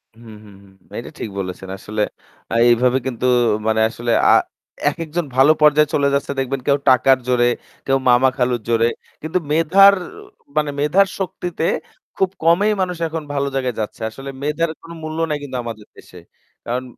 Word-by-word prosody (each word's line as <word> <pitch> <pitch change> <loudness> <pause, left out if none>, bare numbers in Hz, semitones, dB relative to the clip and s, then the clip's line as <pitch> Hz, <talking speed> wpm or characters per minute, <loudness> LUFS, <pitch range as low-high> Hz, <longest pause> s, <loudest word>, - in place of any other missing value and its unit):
হুম, 115 -1 -13
হুম, 100 -1 -15
হুম। 95 -1 -20 0.2
এটা - - -6
ঠিক - - -4
বলেছেন। 95 0 -6
আসলে 105 +2 -4 0.5
আ - - -2 0.2
এইভাবে 125 +2 +3
কিন্তু 125 -1 -3 0.4
মানে 110 0 +2
আসলে 120 +1 -3 0.2
আ - - +7 0.6
এক - - +1
একজন 165 +2 -3
ভালো 135 +4 +6
পর্যায়ে 150 0 +5
চলে 140 -1 +2
যাচ্ছে 140 0 -1
দেখবেন 135 0 -2
কেউ 140 -1 +4
টাকার 130 +1 +5
জোরে, 125 -1 +3 0.4
কেউ 135 0 +2
মামা-খালুর 125 -1 +2
জোরে। 115 0 +3 0.3
কিন্তু 160 +4 -2
মেধার 185 +6 +6 0.6
মানে 150 -1 +2
মেধার 180 +7 +3
শক্তিতে 180 -3 -4 0.5
খুব 190 - +1
কমই 175 +6 +4
মানুষ 180 -1 -2
এখন 160 0 -5
ভালো 140 0 -1
জায়গায় 130 -3 -1
যাচ্ছে। 110 +1 -5
আসলে 135 +5 -9
মেধার 150 +3 0
কোন 165 - -13
মূল্য 155 0 -5
নাই 150 - -1
কিন্তু 130 -3 -5
আমাদের 110 -3 -8
দেশে। 90 - -15 0.5
কারণ 125 +2 -2
135 Hz, 165 wpm, -19 LUFS, 120-155 Hz, 0.6 s, আ